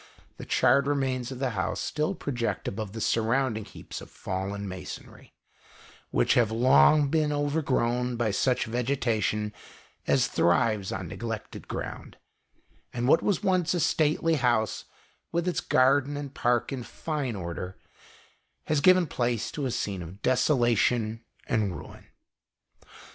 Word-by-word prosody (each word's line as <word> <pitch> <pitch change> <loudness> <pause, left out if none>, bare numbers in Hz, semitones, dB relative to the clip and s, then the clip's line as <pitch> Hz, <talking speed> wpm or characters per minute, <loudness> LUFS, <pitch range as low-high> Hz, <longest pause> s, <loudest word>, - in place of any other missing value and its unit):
The - - -9
charred 140 0 +3
remains 130 -3 -1
of 130 - -6
the 130 -1 -1
house 95 -3 -2
still 155 +5 -1
project 125 -8 -3
above 105 -1 -4
the 110 - -5
surrounding 115 -1 +1
heaps - - -9
of - - -11
fallen 100 +2 -4
masonry, 95 -1 -9 0.7
which - - +2
have 120 -3 +3
long 125 - +5
been 155 0 +1
over 145 +2 0
grown 125 -2 0
by 115 -2 0
such 125 +6 +1
vegetation 115 -3 -1 0.5
as - - +3
thrives 100 +3 +1
on 95 -2 -4
neg - - -9
lected 115 -2 -5
ground; - - -6 0.7
and 120 0 -2
what 155 - +5
was 200 -3 0
once 185 -3 +2
a - - 0
stately 160 +1 +2
house, 120 -5 +1 0.5
with 170 +1 -1
its 180 - 0
garden 140 +2 +3
and 140 -1 -6
park 120 +1 +1
in 130 - -4
fine 140 -1 -4
order, 90 0 -5 0.9
has 155 -2 0
given 185 +2 +6
place 120 -5 -1
to 145 -3 -2
a - - -2
scene 100 -6 -2
of 90 +4 -10
desolation 120 -4 +2 0.2
and 110 -8 0
ruin. - - -12
125 Hz, 145 wpm, -27 LUFS, 110-145 Hz, 0.9 s, given